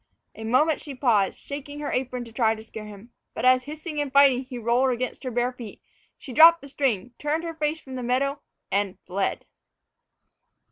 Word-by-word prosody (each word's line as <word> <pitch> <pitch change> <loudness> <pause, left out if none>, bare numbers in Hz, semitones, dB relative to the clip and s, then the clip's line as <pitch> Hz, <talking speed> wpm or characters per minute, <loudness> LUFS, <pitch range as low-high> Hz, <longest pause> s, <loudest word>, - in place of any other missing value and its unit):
A 220 - -9
moment 270 +7 +2
she 285 -3 -8
paused, 230 -7 +2
shaking 290 +1 -7
her 295 - -3
apron 250 -1 -2
to 230 - -12
try 225 -2 +2
to 220 - -11
scare 220 -1 -9
him. 210 +3 -12 0.2
But - - -2
as, 255 0 +5
hissing 305 +1 -5
and 285 -2 -3
fighting, 275 -2 +5
he 255 -1 -8
rolled 240 +3 +2
against 255 +2 -3
her 255 - -3
bare 245 +1 0
feet, 235 -4 -10 0.4
she 260 - -10
dropped 330 +4 +8
the - - -8
string, 250 -6 -1
turned 300 +3 -1
her 335 -1 -4
face 310 0 -1
from 265 -3 -11
the 255 - -4
meadow 275 +4 0 0.3
and 195 -1 0
fled! 190 +2 -2
255 Hz, 195 wpm, -25 LUFS, 235-290 Hz, 0.4 s, dropped